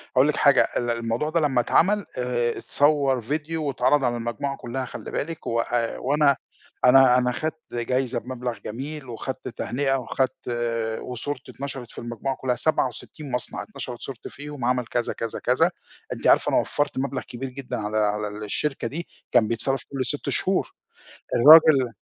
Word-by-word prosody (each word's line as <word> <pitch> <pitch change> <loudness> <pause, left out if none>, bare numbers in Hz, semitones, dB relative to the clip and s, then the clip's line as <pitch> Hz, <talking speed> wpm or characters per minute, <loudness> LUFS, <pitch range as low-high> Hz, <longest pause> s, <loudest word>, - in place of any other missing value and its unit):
هاقول 130 +3 +5
لِك 150 - +1
حاجة، 140 -1 +5
ال 120 - -1
الموضوع 115 +5 -1
ده 170 +2 +1
لمّا 140 -5 +2
اتعمل 205 - +3
آآ 120 -1 0
اتصوّر 140 -3 +2
فيديو 155 +6 -3
واتعرض 135 +1 +2
على 120 -1 +1
المجموعة 120 +4 -3
كُلّها 130 +2 -4
خلّي - - -8
بالِك 165 +1 -4
وآآ 115 0 0
وأنا 140 +1 +3 0.5
أنا 125 0 +7
أنا 125 0 +2
خدت 155 +4 -3
جايزة 125 +1 0
بمبلغ 125 -1 -5
جميل 135 +4 -6
وخدت 125 +3 -5
تهنئة، 135 +3 -1
وخدت 130 0 -2 0.5
وصورتي 130 +2 -5
اتنشرت 135 -3 -7
في - - -16
المجموعة 120 +3 -3
كُلّها، 130 -2 -1
67 140 0 -2
مصنع 125 -1 -3
اتنشرت 125 - -7
صورتي 130 -4 -7
فيهم 145 -2 -8
وعمل 125 0 +1
كذا، 120 0 -1
كذا، 115 -1 -4
كذا. - - +2 0.4
أنتِ - - -2
عارفة - - +5
أنا - - +2
وفّرت 145 - -1
مبلغ 130 -1 -1
كبير 130 +2 -6
جدًا 130 0 -5
على 105 0 -2
على 105 0 +1 0.2
الشركة 135 +4 -2
دي 165 +8 -5 0.2
كان 120 -3 +4
بيتصرف 120 +4 -1
كل 135 -2 -2
6 - - -3
شهور. - - 0 0.6
الراجل 140 -2 +8
130 Hz, 160 wpm, -24 LUFS, 120-145 Hz, 0.6 s, الراجل